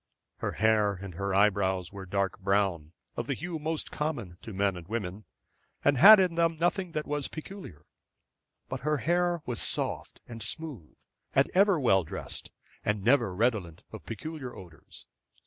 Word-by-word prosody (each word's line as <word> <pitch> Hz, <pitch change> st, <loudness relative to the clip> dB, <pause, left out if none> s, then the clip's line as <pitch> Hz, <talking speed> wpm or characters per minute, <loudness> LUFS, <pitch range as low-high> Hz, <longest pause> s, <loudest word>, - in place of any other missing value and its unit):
Her -, -, -3 dB
hair 110 Hz, -2 st, +3 dB
and 95 Hz, -1 st, -8 dB
eyebrows 95 Hz, -1 st, +1 dB
were 95 Hz, -1 st, -8 dB
dark 100 Hz, 0 st, -1 dB
brown, 95 Hz, -5 st, 0 dB, 0.2 s
of 120 Hz, -, -4 dB
the 140 Hz, -, -1 dB
hue 170 Hz, +3 st, -5 dB
most 160 Hz, +1 st, -3 dB
common 120 Hz, -, -3 dB
to 115 Hz, -, -8 dB
men 100 Hz, -1 st, 0 dB
and 85 Hz, -2 st, -9 dB
women, 105 Hz, -2 st, -4 dB, 0.6 s
and 145 Hz, -, +5 dB
had 210 Hz, +3 st, +11 dB
in 185 Hz, -2 st, +2 dB
them 165 Hz, -1 st, +1 dB
nothing 175 Hz, +1 st, 0 dB
that 155 Hz, -, -2 dB
was 145 Hz, -1 st, -2 dB
peculiar; 160 Hz, -, -9 dB, 0.8 s
but -, -, -4 dB
her 150 Hz, +2 st, 0 dB
hair 175 Hz, +4 st, +1 dB
was 120 Hz, -3 st, -1 dB
soft -, -, -2 dB
and 115 Hz, -1 st, -8 dB
smooth 135 Hz, -, -5 dB, 0.4 s
and 135 Hz, -, +3 dB
ever 195 Hz, -2 st, +4 dB
well 95 Hz, -8 st, +4 dB
dressed, 80 Hz, -, -7 dB, 0.3 s
and 105 Hz, -2 st, -1 dB
never 115 Hz, -6 st, +3 dB
redolent 105 Hz, -7 st, 0 dB
of -, -, -9 dB
peculiar 130 Hz, +3 st, -6 dB
odors. 85 Hz, -4 st, -12 dB
115 Hz, 160 wpm, -29 LUFS, 95-155 Hz, 0.8 s, had